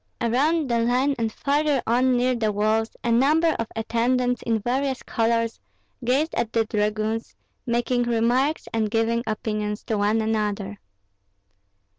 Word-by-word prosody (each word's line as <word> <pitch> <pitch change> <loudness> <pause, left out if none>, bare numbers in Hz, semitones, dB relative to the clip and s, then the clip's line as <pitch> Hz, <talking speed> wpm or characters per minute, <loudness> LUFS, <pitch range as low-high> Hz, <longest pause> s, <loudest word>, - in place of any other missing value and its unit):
Around 285 +7 +1
the 235 -2 +1
line 250 +4 +2
and 225 -1 0
farther 290 +2 +1
on 250 +2 +2
near 250 +1 +2
the 220 -3 0
walls, 215 +2 +1
a 235 - 0
number 305 +7 +3
of 230 - -2
attendants 245 +2 0
in 230 -1 0
various 260 +4 -1
colors 230 0 0 0.4
gazed 270 +7 +1
at 235 -2 -2
the 225 -1 +2
dragoons, 215 +1 -2 0.3
making 240 +1 +1
remarks 240 +6 +1
and 220 -2 0
giving 225 +1 +1
opinions 210 -1 -3
to 220 -4 -2
one 210 +2 +2
another. 210 -2 -2
230 Hz, 140 wpm, -24 LUFS, 220-255 Hz, 0.4 s, number